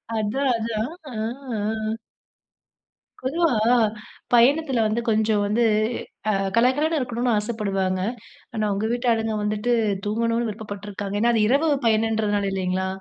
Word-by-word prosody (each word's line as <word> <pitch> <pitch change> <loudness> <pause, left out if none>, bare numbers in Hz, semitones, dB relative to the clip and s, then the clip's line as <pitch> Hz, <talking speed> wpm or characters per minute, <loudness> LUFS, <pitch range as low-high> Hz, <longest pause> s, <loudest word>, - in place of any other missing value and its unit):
அதான், 250 +5 0
அதான் 230 +5 -2 0.2
ஆ, - - -7 0.4
ஆ. 215 +1 -2 1.2
பொதுவா 320 +7 0 0.9
பயணத்தில 260 0 +4
வந்து 225 +2 0
கொஞ்சம் 215 -1 +2
வந்து 220 +4 +1 0.7
அ - - +4 0.2
கலகலன்னு 290 +7 +3
இருக்கணுன்னு 245 -1 -1
ஆசைப்படுவாங்க, 195 -4 -1 0.5
ஆனா 215 -1 -1
உங்க 205 +2 -1
வீட்டாளுங்க 225 -3 +1
வந்துட்டு 215 +3 0 0.3
தூங்கணுன்னு 230 +2 0
விருப்பப்பட்டிருக்காங்க, 205 -1 -6
ஏன்னா 235 +1 +4
அது 215 -2 +3
இரவு 295 +4 +3 0.2
பயணன்றதுனால 215 -2 +1
இல்லைங்களா 190 0 -1
220 Hz, 110 wpm, -23 LUFS, 210-240 Hz, 1.2 s, பயணத்தில